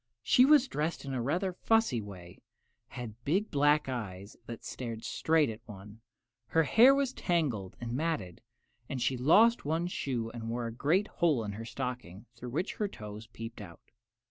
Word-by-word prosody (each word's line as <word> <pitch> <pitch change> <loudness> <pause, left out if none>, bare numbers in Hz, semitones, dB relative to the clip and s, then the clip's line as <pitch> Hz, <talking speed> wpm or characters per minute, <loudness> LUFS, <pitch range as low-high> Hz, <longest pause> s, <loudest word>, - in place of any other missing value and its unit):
She 250 - +6
was 285 -2 +6
dressed 155 - -3
in 135 - -4
a 125 - -1
rather 175 +9 -1
fussy 225 - +2
way, 90 -4 -11 0.5
and 125 - -7
had 115 +2 -32
big 190 - 0
black 145 0 +3
eyes 100 -6 -5
that 115 -1 -8
stared 115 -3 -6
straight 160 -2 +2
at 110 -1 -6
one. 105 +1 -11 0.5
Her 165 - +3
hair 240 - +6
was 275 -2 0
tangled 135 - -1
and 120 -1 -5
matted, 125 - -2 0.5
and 135 - -3
she 130 - +1
had 125 - -5
lost 220 - +5
one 160 +4 0
shoe 125 -9 -3
and 115 -1 -6
worn 120 0 -2
a 115 - -9
great 175 - +2
hole 150 -9 +1
in 105 - -4
her 110 +3 -7
stocking, 120 -6 -6
through 120 +1 -8
which 160 - -3
her 210 - 0
toes 105 - -9
peeped 115 0 -8
out. 85 -5 -13
125 Hz, 185 wpm, -31 LUFS, 115-165 Hz, 0.5 s, She